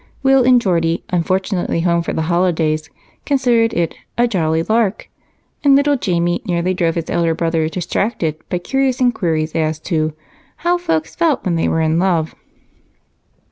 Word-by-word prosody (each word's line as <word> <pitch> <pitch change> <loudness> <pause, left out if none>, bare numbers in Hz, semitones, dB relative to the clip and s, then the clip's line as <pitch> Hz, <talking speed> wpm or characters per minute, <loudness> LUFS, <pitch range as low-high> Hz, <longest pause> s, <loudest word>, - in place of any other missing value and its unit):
Will 270 -1 +5
and 250 0 +5
Geordie, 170 -6 0
unfortunately 180 0 0
home 170 0 +2
for 170 - -4
the 160 - -1
holidays, 160 -2 0 0.3
considered 240 -5 +2
it 170 -1 -1 0.2
"a 240 +1 +3
jolly 165 -6 0
lark," 220 0 0 0.6
and 280 -1 +6
little 285 +1 +3
Jamie 175 -4 0
nearly 180 -2 -1
drove 170 -3 0
his 165 -2 -3
elder 165 -1 +1
brother 165 -1 0
distracted 175 -1 -2
by 180 - -1
curious 265 +7 -1
inquiries 165 -11 0
as 155 -1 0
to 155 -3 -1 0.5
"how 350 0 +2
folks 160 - -1
felt 330 -5 +1
when 180 - 0
they 165 - 0
were 160 - 0
in 160 +1 +1
love." 170 -4 0
175 Hz, 155 wpm, -18 LUFS, 165-230 Hz, 0.6 s, and